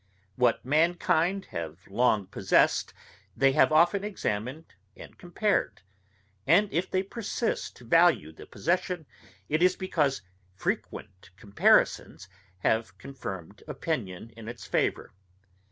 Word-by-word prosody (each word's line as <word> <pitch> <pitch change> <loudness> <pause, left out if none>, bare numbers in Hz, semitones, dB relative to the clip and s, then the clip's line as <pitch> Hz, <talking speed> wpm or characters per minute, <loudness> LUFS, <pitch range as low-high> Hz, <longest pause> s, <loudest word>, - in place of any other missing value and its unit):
What 125 -2 +1
mankind 170 +5 +1
have 80 +1 -6
long 105 -1 +2
possessed 95 - +2 0.5
they 135 +2 +4
have 135 - +4
often 175 +6 +4
examined 135 - -4 0.2
and - - -12
compared; 185 - -1 0.6
and 195 +7 +4
if 175 +3 -1
they 185 0 0
persist 230 +3 -3
to 125 - -15
value 165 - +4
the 80 - -13
possession, 175 -1 -2 0.4
it 155 +2 0
is 180 +1 +4
because 145 - -1 0.3
frequent 95 0 -5
comparisons 100 -2 +2 0.3
have 110 +3 0
confirmed 100 -9 -8
opinion 115 - -4
in 115 -1 -11
its 120 0 -8
favour. - - -1
140 Hz, 115 wpm, -28 LUFS, 105-175 Hz, 0.6 s, they